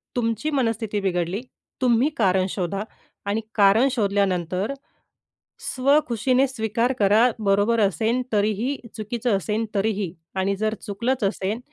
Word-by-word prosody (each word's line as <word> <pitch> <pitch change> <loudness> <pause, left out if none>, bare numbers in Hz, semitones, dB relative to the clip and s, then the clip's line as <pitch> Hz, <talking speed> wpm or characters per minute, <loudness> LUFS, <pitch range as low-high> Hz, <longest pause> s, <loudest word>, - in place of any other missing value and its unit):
तुमची 230 +3 -1
मनस्थिती 225 -6 0
बिघडली, 180 +1 -1 0.4
तुम्ही 250 +2 +3
कारण 190 -3 +3
शोधा 195 +2 -2 0.4
आणि 205 +2 -1
कारण 205 +5 +5
शोधल्यानंतर 200 -2 0 1.0
स्वखुशीने 260 -1 +2
स्वीकार 230 0 0
करा, 215 +4 +5
बरोबर 205 +2 +2
असेल 220 +5 +1
तरीही, 215 +6 +1 0.2
चुकीचं 230 0 -1
असेल 210 +3 -1
तरीही. 200 -3 0 0.2
आणि 190 +1 0
जर 215 +2 -1
चुकलंच 230 +4 -1
असेल 195 +2 -1
215 Hz, 115 wpm, -23 LUFS, 195-235 Hz, 1.0 s, कारण